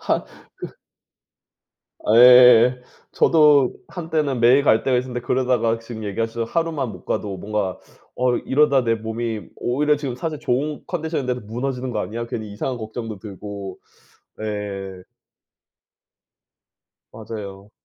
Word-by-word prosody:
한 - - -1 0.3
그 - - -7 1.4
예. 125 0 +8 0.3
저도 150 -5 +4
한때는 160 -6 -2
매일 125 +4 +5
갈 110 -5 +3
때가 130 -2 +2
있었는데 125 -1 -4
그러다가 125 -3 +1
지금 115 -1 -8
얘기하셔서 115 +3 -2
하루만 165 -6 -1
못 - - -12
가도 100 -2 -3
뭔가 100 -1 -2 0.4
'어 125 -1 +1
이러다 140 -1 +2
내 115 -1 +2
몸이 110 0 -4
오히려 150 +4 +1
지금 140 -4 -4
사실 155 +2 -4
좋은 140 +4 -2
컨디션인데도 155 -7 -3
무너지는 125 +4 -4
거 110 - -3
아니야?' 115 +3 -4
괜히 110 -3 -5
이상한 125 +4 -4
걱정도 110 -1 -6
들고 100 -1 -8 0.6
예. 100 -3 -5 2.1
맞아요. 105 -2 -9
120 Hz, 270 characters per minute, -22 LUFS, 110-135 Hz, 2.1 s, 예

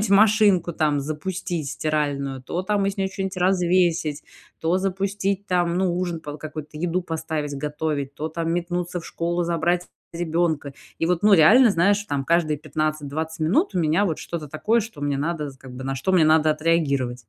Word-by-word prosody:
какую-нибудь 210 -1 -1
машинку, 205 -4 +4
там, 150 -3 +1
запустить, 160 +1 -4
стиральную, 145 -3 -2
то, 175 +7 -3
там, 200 0 0
из 195 +1 -2
нее 195 0 0
чё-нить 190 -1 -4
развесить, 175 -4 +2 0.4
то 170 +3 +1
запустить, 195 +1 -1
там, 175 -1 +1
ну, 185 -2 +1
ужин 175 -3 -2
под 150 0 -8
какой-то, 155 -1 -7
еду 175 +2 -1
поставить 160 -3 -3
готовить, 150 -1 -3
то, 155 +1 -4
там, 165 +1 -3
метнуться 175 0 -2
в - - -11
школу 175 +1 -2
забрать 170 +1 0 0.3
ребенка. 165 -4 -1 0.3
И - - 0
вот, 175 0 0
ну, 210 -1 +7
реально, 220 +9 +7
знаешь, 200 +3 +3
там 140 -6 -2
каждые 165 -1 +2
15-20 155 +1 -3
минут 210 - +2
у - - +1
меня, 165 +4 +2
вот, 160 - -2
что-то 165 -3 -5
такое, 215 - +1
что 215 -8 -8
мне 145 -1 0
надо 150 -1 -2
з 135 - -16
как 130 0 -12
бы, 130 +1 -7
на 135 - -2
что 135 +9 -1
мне 170 -4 +5
надо 155 0 +4
отреагировать. 140 -7 0
165 Hz, 185 wpm, -23 LUFS, 150-185 Hz, 0.4 s, ну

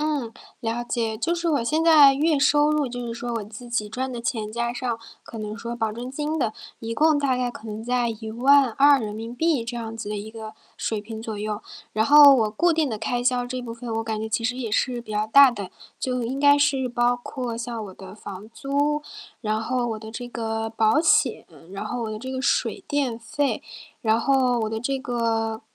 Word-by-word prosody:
嗯， 290 -7 -1 0.3
了 235 +1 -2
解。 225 -2 -2
就 335 +7 0
是 340 0 -2
我 285 -7 +1
现 310 +6 +1
在 300 -4 +7
月 300 +1 +2
收 295 +1 +4
入， 300 -2 +1
就 245 0 -5
是 230 - -3
说 240 0 -4
我 225 - -2
自 215 +4 -10
己 215 -3 -1
赚 255 +3 -3
的 235 - -5
钱 220 -3 -3
加 235 0 -1
上 240 -1 -2 0.3
可 225 - -9
能 215 +1 -5
说 235 +1 -5
保 225 -2 -1
证 240 +3 -6
金 300 +4 -3
的， 220 -5 0 0.3
一 230 0 -5
共 305 +2 +4
大 270 -3 +1
概 250 -1 -1
可 225 -2 -11
能 215 +1 -6
在 245 0 0
¥12000 240 +2 +2
这 240 +1 -5
样 225 -1 -5
子 220 - -6
的 210 - -3
一 210 +2 -6
个 220 -1 -9 0.2
水 220 -2 -2
平 220 +1 -8
左 220 -1 -5
右。 210 +1 -3 0.3
然 220 +1 +1
后 290 -1 +9
我 225 -5 +3
固 340 +11 +2
定 315 -3 +1
的 220 - -3
开 240 +3 -2
销 250 -1 +2
这 255 +1 -4
部 230 -2 -7
分 235 -1 -6
我 225 - -2
感 220 -1 -3
觉 220 - -3
其 230 +1 -1
实 245 +2 0
也 235 -4 -4
是 245 +2 0
比 230 - -12
较 210 +1 0
大 275 +4 +8
的， 205 -6 -6 0.3
就 250 -1 -2
应 255 +4 -3
该 285 0 +6
是 275 -3 +2
包 240 0 +2
括 245 -3 -5
像 230 -2 -4
我 190 - -10
的 190 0 -11
房 205 0 -9
租， 290 +3 0 0.4
然 215 -1 -1
后 245 +1 -1
我 220 -1 -3
的 220 0 -10
这 245 +1 -6
个 225 -2 -3
保 225 +5 +3
险， 305 -6 +3 0.3
然 195 - -5
后 245 -1 -3
我 215 - -4
的 215 - -6
这 260 +1 -6
个 260 0 -3
水 355 +7 0
电 275 -6 -1
费， 235 +1 -1 0.4
然 225 0 +2
后 255 -2 +2
我 220 0 -1
的 220 - -2
这 270 +4 -1
个 225 -3 -1
240 Hz, 240 characters per minute, -24 LUFS, 220-270 Hz, 0.4 s, 后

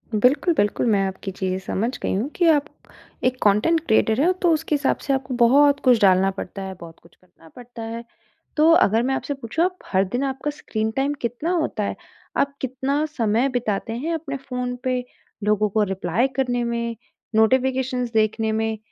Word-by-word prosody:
बिल्कुल, 270 - +3
बिल्कुल, 205 -4 +1
मैं 195 -2 +3
आपकी 190 0 -6
चीज़ें 185 -1 -2
समझ 230 +7 -2
गई - - -1
हूँ 220 +9 -1
कि 350 - +2
आप 295 -2 +3 0.6
एक 255 0 +1
कॉन्टेंट 210 +12 +3
क्रिएटर 220 +2 +3
हैं 360 +4 +4
तो 350 - +4
उसके 315 -1 0
हिसाब 285 -1 +1
से 275 - +1
आपको 265 -1 -2
बहुत 280 +4 +5
कुछ 250 -4 +4
डालना 190 0 +4
पड़ता 195 0 -7
है, 190 0 -5
बहुत 165 -1 -12
कुछ 170 - -21
करना 175 -3 -21
पड़ता 245 -1 -10
है। 230 +1 -5 0.5
तो 310 +2 +5
अगर 225 -8 +4
मैं 265 +2 0
आपसे 285 +1 -3
पूछूँ 270 +6 -1
आप 365 0 -1
हर 190 0 +2
दिन 245 +7 -3
आपका 270 +2 -2
स्क्रीन 220 0 -2
टाइम 275 +2 +1
कितना 245 +8 -2
होता 315 - -1
है? - - -3 0.4
आप 280 0 +1
कितना 265 +3 -1
समय 235 -3 +1
बिताते 225 -4 -2
हैं 325 +6 -2
अपने 295 -4 -4
फोन 250 -1 -3
पे 255 -1 0 0.4
लोगों 210 0 +2
को 215 +2 +2
रिप्लाई 190 +7 0
करने 245 -2 0
में, 235 -1 -2 0.4
नोटिफ़िकेशंस 255 +1 +1
देखने 220 0 +1
में? 220 0 -1
245 Hz, 185 wpm, -22 LUFS, 215-275 Hz, 0.6 s, बहुत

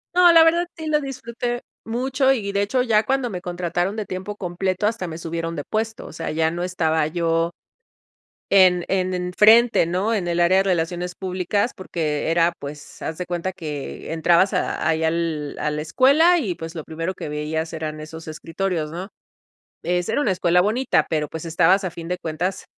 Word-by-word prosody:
No, 355 -1 +7
la 330 -1 +8
verdad, 340 +2 +3
sí, 320 - -6
lo 300 -1 +2
disfruté 240 -2 -4 0.2
mucho 260 +3 +1
y 205 -6 -3
de 200 0 0
hecho, 250 +5 +1
ya 220 -4 +3
cuando 260 0 0
me 180 -2 -5
contrataron 175 +2 -2
de 215 -2 -3
tiempo 190 +3 -5
completo 185 +1 -2
hasta 215 -4 -1
me 160 -1 -6
subieron 165 0 -4
de 145 - -4
puesto, 220 +4 -3
o - - -10
sea, 165 +1 -4
ya 160 +1 +1
no 175 +1 -4
estaba 160 -4 +1
yo 165 0 0 1.0
en 185 -3 +5
en 185 -1 0
en 180 0 -3
frente, 225 -1 +6
¿no?, 190 +6 0
en 185 -5 -1
el 170 0 0
área 175 +2 +4
de 195 - +5
relaciones 175 -1 -1
públicas, 190 +5 -1
porque 160 -5 -2
era, 170 +1 +3
pues, 145 +1 -9
haz 160 - -4
de 180 - -4
cuenta 175 +1 -3
que 150 -2 -6
entrabas 170 +4 +3
a 180 - -1
ahí 160 0 +1
al 160 -2 -1
a 150 0 -1
la 150 - -3
escuela 280 - +4
y 210 - -2
pues, 165 +1 -8
lo 160 - -5
primero 165 +3 -4
que 160 - -6
veías 155 +2 -3
eran 155 -1 -4
esos 160 +1 -9
escritorios, 165 0 -3
¿no? 180 +3 -6 0.8
Es 180 0 0
era 230 +6 0
una 220 - +2
escuela 180 -1 +3
bonita, 230 +7 +1
pero 155 -2 0
pues, 160 +1 -7
estabas 175 +4 +3
a 185 - -2
fin 165 0 -8
de 180 +1 -2
cuentas 175 +4 -3
180 Hz, 195 wpm, -22 LUFS, 165-210 Hz, 1.0 s, la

